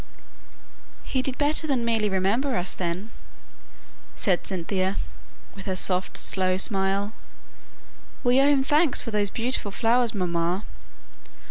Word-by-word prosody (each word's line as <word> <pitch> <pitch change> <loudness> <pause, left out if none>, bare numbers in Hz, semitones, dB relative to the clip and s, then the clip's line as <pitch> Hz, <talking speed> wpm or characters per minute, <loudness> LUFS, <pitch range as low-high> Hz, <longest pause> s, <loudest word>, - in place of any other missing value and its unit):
"He 260 - -1
did 260 0 -3
better 305 +2 +2
than 255 -5 0
merely 225 -2 +1
remember 205 +8 0
us 180 +1 -1
then," 185 +5 -4 1.0
said 185 -3 +1
Cynthia, 190 +1 0 0.6
with 195 -1 -11
her 190 - -1
soft 185 0 +1
slow 185 -1 +1
smile. 195 +1 +1 1.1
"We 250 +2 +4
owe 275 - +4
him 280 -2 +3
thanks 295 +1 +3
for 230 - -5
those 205 -1 +1
beautiful 235 -2 -2
flowers, 230 +2 +1
mamma." 175 +1 -1
205 Hz, 125 wpm, -25 LUFS, 185-250 Hz, 1.1 s, We